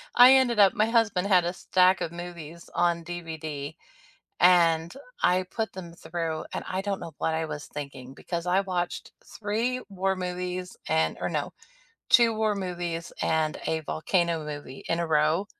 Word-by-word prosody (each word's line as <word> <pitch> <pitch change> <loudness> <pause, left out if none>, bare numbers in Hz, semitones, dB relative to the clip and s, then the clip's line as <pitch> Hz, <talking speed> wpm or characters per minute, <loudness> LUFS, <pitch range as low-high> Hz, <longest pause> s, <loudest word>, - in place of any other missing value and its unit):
I 250 +2 +9
ended 245 -4 +3
up 195 -1 +7
my 215 +1 +2
husband 220 -5 +2
had 180 -3 +4
a 175 - -1
stack 185 0 +3
of 165 - -2
movies 170 -1 -9
on 170 -1 +1
DVD, 160 -4 -6 0.6
and 170 -2 +4 0.3
I 185 +1 +3
put 220 +3 -4
them 175 -3 -8
through, 165 -1 -4
and - - -3
I 185 +1 -2
don't 200 -1 -3
know 165 - -7
what 160 - 0
I 160 0 -1
was 150 -1 -6
thinking 140 -3 -8
because 170 +2 -5
I 185 +2 +3
watched 180 -2 -3
3 230 +5 -2
war 195 0 0
movies 180 0 -4
and 160 +1 +1
or - - -1
no, - - -2 0.6
2 235 -2 +6
war 215 -1 +1
movies, 175 -3 -4
and 155 -1 +1
a 160 0 0
volcano 165 0 0
movie 145 -3 -8
in 165 +1 0
a 170 - -1
row. 155 +5 +2
175 Hz, 170 wpm, -27 LUFS, 160-190 Hz, 0.6 s, I